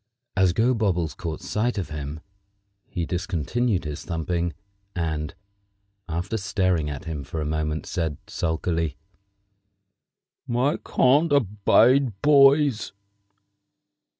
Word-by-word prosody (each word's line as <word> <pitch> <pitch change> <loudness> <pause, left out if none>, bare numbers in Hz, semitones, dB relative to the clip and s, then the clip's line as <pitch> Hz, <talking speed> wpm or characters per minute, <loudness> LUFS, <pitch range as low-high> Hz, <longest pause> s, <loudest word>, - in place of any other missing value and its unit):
As 95 -2 +4
Gobobbles 105 -8 +1
caught 80 -6 -5
sight 115 +2 -1
of 95 - -3
him 75 +1 -5 0.7
he 85 -2 -3
discontinued 90 - -1
his 75 -1 -5
thumping, 85 0 -2 0.4
and, 80 -3 -2 0.7
after 85 +7 -2
staring 95 -6 0
at 75 +1 -6
him 80 -4 -4
for 75 +4 -5
a 75 - -2
moment, 75 0 -2
said 80 -5 -2
sulkily: 80 -2 -2 1.5
"I 125 +5 +1
can't 145 +5 +3
abide 115 0 +3
boys!" 140 -5 +5
90 Hz, 100 wpm, -25 LUFS, 80-115 Hz, 1.5 s, boys